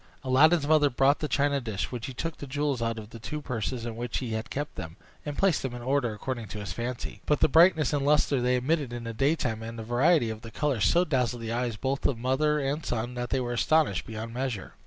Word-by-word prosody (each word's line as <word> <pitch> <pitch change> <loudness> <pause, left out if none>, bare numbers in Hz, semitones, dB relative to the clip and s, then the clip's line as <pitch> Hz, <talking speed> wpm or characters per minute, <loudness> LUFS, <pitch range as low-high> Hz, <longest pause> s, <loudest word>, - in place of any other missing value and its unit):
Aladdin's 145 +5 +4
mother 150 -1 +4
brought 135 +3 +3
the 150 - -2
china 140 -1 +1
dish, 110 -5 -3
when 125 -2 -4
he 130 - -5
took 165 +5 -4
the 145 - -8
jewels 140 -2 -1
out 115 0 -1
of 110 0 -9
the 115 - -9
two 150 +7 -5
purses 125 -3 -3
in 115 -2 -4
which 120 0 -3
he 125 -3 -4
had 110 +1 -3
kept 145 +1 -4
them, 80 +3 -8 0.3
and 145 - -4
placed 195 -5 +2
them 130 -2 -4
in 120 - -7
order 130 -2 +1
according 115 +1 -5
to 105 - -7
his 105 -1 -5
fancy. 120 +1 -5
But 150 - +2
the - - +5
brightness 160 -3 +5
and 145 -1 +1
lustre 145 -2 +3
they 125 +1 +2
emitted 135 0 0
in 120 -1 -5
the 115 0 -5
daytime, 130 -3 0
and 115 +1 -7
the 115 - -5
variety 120 +2 +3
of 110 0 -7
the 115 - -9
colors, 130 -4 0
so 175 - +4
dazzled 125 -5 0
the 115 - -3
eyes 120 -2 -1
both 135 +3 0
of 130 - -1
mother 140 +5 +1
and 145 +3 -2
son 120 +1 -2
that 120 0 -4
they 135 - +1
were 120 -1 -2
astonished 145 - +2
beyond 115 +1 -6
measure. 125 -5 -3
125 Hz, 250 wpm, -28 LUFS, 115-145 Hz, 0.3 s, the